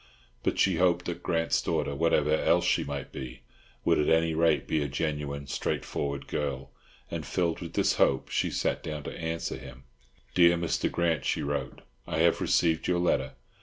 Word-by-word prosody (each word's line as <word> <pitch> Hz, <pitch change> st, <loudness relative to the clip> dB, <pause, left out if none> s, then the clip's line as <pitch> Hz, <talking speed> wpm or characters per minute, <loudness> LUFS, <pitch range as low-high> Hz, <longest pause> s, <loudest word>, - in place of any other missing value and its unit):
But -, -, -1 dB
she 95 Hz, -4 st, +3 dB
hoped 90 Hz, 0 st, +2 dB
that 85 Hz, -, -4 dB
Grant's 80 Hz, -2 st, +1 dB
daughter, 70 Hz, -, -1 dB
whatever 75 Hz, 0 st, +2 dB
else 80 Hz, -, +3 dB
she -, -, +2 dB
might 70 Hz, 0 st, -5 dB
be, 65 Hz, -2 st, -7 dB, 0.4 s
would -, -, +3 dB
at 75 Hz, -, +2 dB
any 80 Hz, 0 st, +3 dB
rate 80 Hz, -1 st, +2 dB
be 80 Hz, -, +1 dB
a 70 Hz, -, -1 dB
genuine, 70 Hz, -1 st, -3 dB
straight -, -, -2 dB
forward 70 Hz, -1 st, -3 dB
girl; 70 Hz, -2 st, -3 dB, 0.4 s
and -, -, -3 dB
filled 85 Hz, -2 st, -1 dB
with 85 Hz, -2 st, -7 dB
this -, -, +2 dB
hope, 65 Hz, -, +3 dB
she -, -, 0 dB
sat -, -, -1 dB
down 75 Hz, -2 st, -5 dB
to -, -, -6 dB
answer 80 Hz, 0 st, -3 dB
him: 65 Hz, +2 st, -11 dB, 0.5 s
"Dear 85 Hz, +2 st, +5 dB
Mr. 85 Hz, -1 st, -1 dB
Grant," 85 Hz, -5 st, 0 dB
she -, -, 0 dB
wrote, 70 Hz, -1 st, -3 dB, 0.3 s
"I 80 Hz, -, -2 dB
have 85 Hz, +1 st, +3 dB
received 80 Hz, -2 st, +2 dB
your 90 Hz, -, +2 dB
letter. 70 Hz, -6 st, +1 dB
80 Hz, 185 wpm, -28 LUFS, 70-85 Hz, 0.5 s, Dear